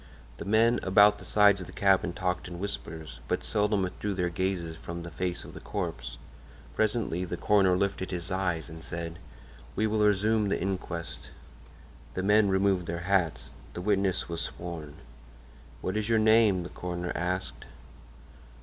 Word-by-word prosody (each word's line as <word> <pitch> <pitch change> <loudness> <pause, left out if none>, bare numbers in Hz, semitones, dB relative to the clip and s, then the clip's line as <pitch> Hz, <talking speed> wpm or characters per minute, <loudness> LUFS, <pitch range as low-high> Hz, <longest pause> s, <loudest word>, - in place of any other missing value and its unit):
The - - -6
men 115 +3 +4
about 105 +2 +5
the - - -10
sides 100 -2 +5
of 90 - -7
the - - -10
cabin 95 -3 +3
talked 90 0 -2
in 90 - -7
whispers, 80 -8 -6
but - - -1
seldom 105 -1 +1
withdrew 100 +2 -3
their 90 -1 0
gaze 85 -2 -2
from 85 0 -6
the 85 - -8
face 90 +3 -3
of - - -11
the - - -8
corpse. - - -4 0.6
Presently 105 -5 0
the 90 -1 -4
coroner 95 -3 +4
lifted 100 -1 -1
his 90 0 -3
eyes 90 -4 -1
and 80 -1 -9
said: 85 +1 -5 0.6
"We 110 - +1
will 110 0 +1
resume 105 +1 +3
the - - 0
inquest." 90 -3 -4 0.9
The 95 - -1
men 105 +1 +4
removed 95 -2 +2
their 85 +1 -3
hats. 90 -5 +1 0.2
The 90 - -4
witness 100 -1 +1
was 85 -1 -3
sworn. 85 -4 -6 0.9
"What 95 - -2
is 110 +1 -1
your 115 - +4
name?" 110 -4 +5
the 85 - -7
coroner 90 0 -4
asked. 90 +2 -3
95 Hz, 165 wpm, -29 LUFS, 85-105 Hz, 0.9 s, about